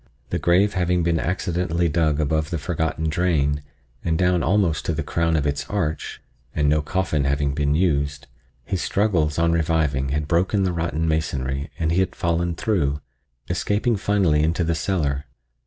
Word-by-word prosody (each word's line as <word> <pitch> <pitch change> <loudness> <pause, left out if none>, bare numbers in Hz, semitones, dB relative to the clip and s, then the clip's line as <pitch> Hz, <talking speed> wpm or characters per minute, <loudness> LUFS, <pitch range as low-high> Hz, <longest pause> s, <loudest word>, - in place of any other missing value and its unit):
The - - 0
grave 95 +4 +3
having 90 -1 +1
been 85 -1 +1
accidentally 85 0 0
dug 80 -2 +1
above 80 +1 0
the 85 - -2
forgotten 80 +1 -2
drain, 75 -3 +1 0.4
and 80 -2 0
down 90 -1 +2
almost 95 -5 +1
to 85 - 0
the 80 0 -2
crown 80 +2 0
of 75 -2 +1
its 70 0 -2
arch, 80 -7 -2 0.4
and 75 -1 +2
no 75 +1 +3
coffin 80 -2 -1
having 70 0 0
been 75 0 +1
used, 70 -5 0 0.4
his 90 +7 -2
struggles 90 -8 +1
on 85 0 +3
reviving 80 -5 +1
had 75 +1 -1
broken 95 +5 +2
the 90 -2 0
rotten 80 -1 -1
masonry 70 -3 -1
and 80 -1 0
he 85 - +2
had 95 - 0
fallen 85 0 0
through, 75 -8 0 0.5
escaping 110 +3 0
finally 95 -7 +2
into 80 +3 +1
the 85 0 0
cellar. 75 -5 -1
80 Hz, 170 wpm, -23 LUFS, 75-90 Hz, 0.5 s, grave